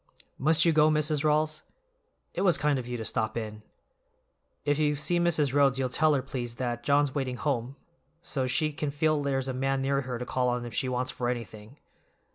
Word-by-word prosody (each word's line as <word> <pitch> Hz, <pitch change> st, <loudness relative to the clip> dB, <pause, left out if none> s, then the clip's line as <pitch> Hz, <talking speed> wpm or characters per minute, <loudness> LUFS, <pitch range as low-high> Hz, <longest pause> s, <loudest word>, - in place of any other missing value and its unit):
"Must 155 Hz, +4 st, +4 dB
you 165 Hz, -, +4 dB
go, 155 Hz, 0 st, +5 dB
Mrs. 155 Hz, -1 st, +1 dB
Rawls? 155 Hz, 0 st, +1 dB, 0.7 s
It -, -, -3 dB
was 180 Hz, -6 st, +4 dB
kind 145 Hz, -2 st, +1 dB
of 120 Hz, -, -7 dB
you 125 Hz, 0 st, -3 dB
to 110 Hz, -, -5 dB
stop 110 Hz, 0 st, -2 dB
in. 110 Hz, -1 st, -5 dB, 1.0 s
If 145 Hz, 0 st, +1 dB
you 150 Hz, -1 st, +2 dB
see 175 Hz, +4 st, +1 dB
Mrs. 155 Hz, -6 st, +2 dB
Rhodes 140 Hz, -2 st, +4 dB
you'll 130 Hz, -1 st, 0 dB
tell 155 Hz, +4 st, +3 dB
her, 135 Hz, -, -1 dB
please, 120 Hz, -3 st, -5 dB
that 120 Hz, -1 st, -3 dB
John's 145 Hz, 0 st, +2 dB
waiting 130 Hz, -3 st, -2 dB
home 130 Hz, -2 st, -2 dB, 0.4 s
so's 130 Hz, -6 st, -3 dB
she 155 Hz, +4 st, +1 dB
can 145 Hz, 0 st, -3 dB
feel 150 Hz, +1 st, +1 dB
there's 135 Hz, -2 st, -1 dB
a 130 Hz, -, -2 dB
man 135 Hz, +1 st, 0 dB
near 140 Hz, 0 st, +1 dB
her 125 Hz, -2 st, -4 dB
to 125 Hz, -, -5 dB
call 125 Hz, 0 st, 0 dB
on 120 Hz, 0 st, -2 dB
if 120 Hz, -, -8 dB
she 130 Hz, -4 st, -1 dB
wants 125 Hz, 0 st, -1 dB
for 120 Hz, -1 st, -2 dB
anything." 115 Hz, +1 st, -6 dB
135 Hz, 210 wpm, -28 LUFS, 125-150 Hz, 1.0 s, go